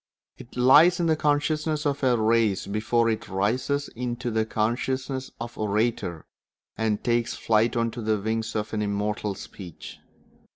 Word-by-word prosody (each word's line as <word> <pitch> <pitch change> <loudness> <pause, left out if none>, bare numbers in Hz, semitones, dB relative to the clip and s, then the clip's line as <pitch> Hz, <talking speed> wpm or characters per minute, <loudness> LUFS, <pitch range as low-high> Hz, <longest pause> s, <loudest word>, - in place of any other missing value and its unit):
It 120 - -12
lies 145 +9 +6
in 170 - +1
the 160 -1 +3
consciousness 150 +1 0
of 145 -1 0
a 125 -2 +4
race 110 -3 +2
before 110 +3 +1
it 110 - -4
rises 125 +9 0
into 120 0 -4
the 110 0 0
consciousness 130 +4 -1
of 120 0 -6
the - - -16
orator 105 -5 -1 0.5
and 110 -2 -1
takes 120 -1 0
flight 115 +2 +2
on 115 -1 +1
the 110 -3 -1
wings 110 +2 -2
of 105 0 -3
immortal 105 -1 -1
speech. 90 -3 -10
115 Hz, 150 wpm, -26 LUFS, 105-130 Hz, 0.5 s, lies